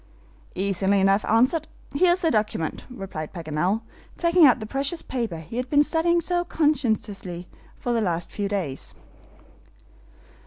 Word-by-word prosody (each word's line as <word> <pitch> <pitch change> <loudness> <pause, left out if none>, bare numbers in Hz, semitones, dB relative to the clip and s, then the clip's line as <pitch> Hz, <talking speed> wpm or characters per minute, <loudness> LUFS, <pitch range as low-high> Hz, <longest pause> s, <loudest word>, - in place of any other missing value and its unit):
"Easily 195 +1 +2
enough 195 +2 +3
answered. 255 +8 +2 0.3
Here 345 +5 +4
is 365 - -2
the 325 - +2
document," 210 -7 -1
replied 190 -10 -7
Paganel, 170 +5 -1 0.4
taking 340 -2 +6
out 250 - +4
the 215 - -5
precious 275 +8 -1
paper 230 -9 -3
he 160 +8 -8
had 250 0 -2
been 290 0 +5
studying 330 +3 +2
so 350 +1 0
conscientiously 220 - -1 0.3
for 245 - -2
the 230 - +1
last 175 -4 -2
few 205 -1 -2
days. 175 -10 -3
220 Hz, 145 wpm, -24 LUFS, 190-295 Hz, 0.4 s, taking